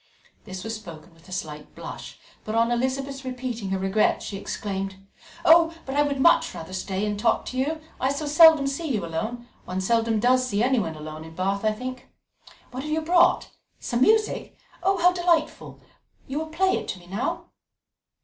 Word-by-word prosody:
This 185 0 -7
was 225 - -4
spoken 170 -4 -12
with 165 +3 -20
a - - -12
slight 150 -4 -6
blush, - - -8 0.3
but 215 - -4
on 230 +1 +3
Elizabeth's 270 +3 -2
repeating 250 -5 -4
her 190 - 0
regrets 195 +3 +1
she 200 - -5
exclaimed: 195 -1 -4 0.5
"Oh, 330 0 +6
but 270 - -5
I 290 - +4
would 285 -2 0
much 300 - +4
rather 165 +1 -8
stay 190 +1 -2
and 210 -1 -2
talk - - +1
to 255 - -6
you. 310 +4 -1 0.2
I 260 +1 +1
so 285 +2 -3
seldom 310 -1 +7
see 275 +4 -2
you 200 -5 -2
alone; 220 +9 -4 0.2
one 185 +1 -3
seldom 225 +2 +1
does 255 +3 +3
see 205 -1 0
anyone 235 -11 +1
alone 155 0 -8
in 160 0 -12
Bath, 195 +3 -1
I 215 - +3
think. 255 +3 -7 0.6
What 255 +1 -5
have 305 +2 -5
you 315 +1 +1
brought? 345 +2 +3 0.3
Some 240 -1 -2
music? 435 +8 +2 0.2
How 360 -1 +3
delightful! 345 -3 0 0.5
You 275 +3 -3
will 315 - -4
play 375 +4 +2
it - - -9
to 185 - -4
me 175 - -17
now." 195 +7 -3
240 Hz, 190 wpm, -25 LUFS, 195-290 Hz, 0.6 s, seldom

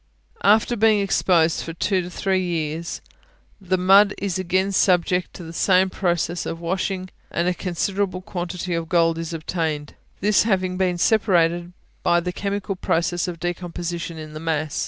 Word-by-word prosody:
After 220 +3 +4
being 215 -1 +4
exposed 175 -4 +2
for 165 - -6
two 185 +1 0
or - - -7
three 190 0 0
years, 165 -1 -3 0.6
the 185 0 0
mud 195 +3 +5
is 190 -2 -2
again 185 +2 +1
subjected 180 -1 +2
to 180 - -9
the 165 0 -9
same 185 +1 +3
process 175 -2 -1
of 165 - -4
washing, 185 +2 -2 0.2
and 170 +1 -1
a 180 - +2
considerable 185 +1 -2
quantity 180 -1 -4
of 165 -1 -3
gold 165 -2 +2
is 165 0 -4
obtained, 160 -2 -3 0.3
this 210 +1 +3
having 185 -4 0
been 185 -1 0
separated 175 -4 +2 0.3
by 175 - +3
the 180 +1 -4
chemical 200 +1 -3
process 175 0 0
of 175 -2 -5
decomposition 175 -1 -4
in 155 -1 -8
the 155 - -6
mass. 155 -2 -2
180 Hz, 160 wpm, -22 LUFS, 170-190 Hz, 0.6 s, mud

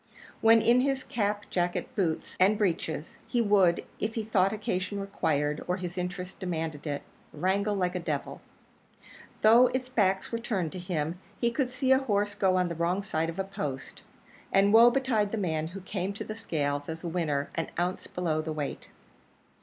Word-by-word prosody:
When 225 0 +6
in 240 +1 +5
his 270 0 +1
cap, 205 -2 -1
jacket, 175 -1 0
boots, 170 -6 -1
and 195 +3 +5
breeches, 165 -6 -2
he 245 - 0
would, 200 -6 +4 0.2
if 220 +2 -2
he 225 - -1
thought 195 -3 +2
occasion 200 -2 -2
required 150 -7 -1
or 180 +1 0
his 180 -1 -5
interests 180 +1 -4
demanded 160 -5 -4
it, 145 -1 -3 0.3
wrangle 195 +6 0
like 180 -2 0
a 180 - -2
devil. 170 - -4 1.0
Though 230 +4 +7
its 255 0 -3
back 195 -6 +2
were 230 - -1
turned 190 -9 -2
to 185 - -6
him, 175 -1 -2 0.2
he 235 -1 +2
could 255 +1 0
see 260 +1 0
a 265 - +7
horse 205 -5 0
go 190 -2 +2
on 180 -1 +2
the 170 - -3
wrong 170 +4 0
side 165 -4 -1
of 165 - -6
a 195 - 0
post; 170 -9 -5 0.5
and 200 +1 +4
woe 230 +2 +9
betide 240 -5 +1
the 225 - -2
man 160 -5 -1
who 190 +4 -8
came 190 +1 -3
to 200 - -5
the 215 - -6
scales 145 -9 -2
as 160 +1 -6
a - - -3
winner 155 -5 -1
an 165 - -2
ounce 180 +2 -1
below 165 -3 -1
the 160 0 -4
weight. 150 -2 -4
190 Hz, 190 wpm, -29 LUFS, 165-215 Hz, 1.0 s, woe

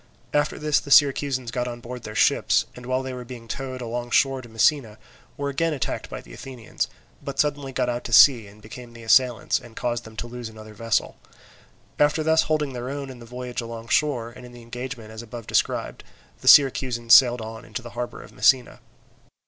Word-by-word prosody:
After 145 0 +1
this 150 -1 +1
the - - -11
Syracusans 135 -3 +3
got 125 0 -2
on 120 -1 -6
board 120 +1 -8
their 110 -2 -8
ships, - - +3
and 125 0 -11
while 130 +1 0
they 130 -1 -5
were 125 -1 -7
being 120 -1 -10
towed 130 +1 -5
alongshore 120 +3 0
to 120 - -13
Messina, 115 0 +1 0.4
were 140 0 -2
again 165 +4 0
attacked 135 - -4
by - - -7
the - - -15
Athenians, 125 - -5 0.4
but - - -6
suddenly 145 -2 0
got 125 - -1
out 120 0 -2
to - - -5
sea 120 -3 +7
and 105 +1 -17
became 120 +2 -11
the 115 0 -12
assailants, 125 +1 +3
and 115 - -15
caused 120 -1 -2
them 110 0 -13
to 115 - -4
lose 120 -1 -7
another 110 -1 -12
vessel. 115 +1 -1 0.8
After 150 +2 +3
thus 160 +1 +4
holding 150 -3 -1
their 125 +1 -5
own 140 -1 -5
in 125 - -12
the 120 - -12
voyage 125 0 -5
alongshore 115 +2 -1
and 125 - -13
in 125 0 -12
the 120 -1 -12
engagement 120 -1 -7
as 110 0 -8
above 115 0 -9
described, - - -1 0.4
the - - -10
Syracusans 125 -4 +5
sailed 125 -2 +7
on 110 0 -8
into 115 +3 -7
the 120 - -9
harbour 120 0 -6
of - - -16
Messina. 130 -3 +2
125 Hz, 205 wpm, -24 LUFS, 115-135 Hz, 0.8 s, sea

